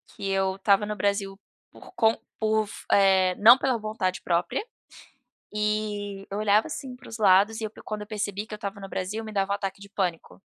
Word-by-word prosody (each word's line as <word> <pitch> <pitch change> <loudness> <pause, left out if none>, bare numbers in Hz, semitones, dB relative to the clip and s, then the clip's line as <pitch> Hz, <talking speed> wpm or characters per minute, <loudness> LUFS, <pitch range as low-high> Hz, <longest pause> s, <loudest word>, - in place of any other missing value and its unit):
que 195 - -4
eu 190 0 +1
estava 200 +1 +3
no 210 0 -3
Brasil 200 -1 -1 0.3
por - - -15
com 225 -1 +3 0.2
por 220 -1 +2
f - - -11
eh, 190 -2 +5
não 235 +5 +9
pela 260 -3 0
vontade 215 -4 -2
própria, 175 - 0 0.9
e 210 -2 -2
eu 200 - -4
olhava 210 +3 +3
assim 270 -5 -6
para 250 - -14
os 225 - -7
lados 205 +2 +4
e - - -5
eu 215 - -3
pro - - -15
quando 215 -1 -5
eu 210 - -8
percebi 210 -1 -3
que 215 - -10
eu - - -2
estava 200 -1 -6
no 195 - -7
Brasil 200 +4 -4
me 215 - -8
dava 195 0 0
um - - +2
ataque 195 -1 -5
de 200 - -12
pânico. 175 - -3
205 Hz, 215 wpm, -26 LUFS, 195-215 Hz, 0.9 s, não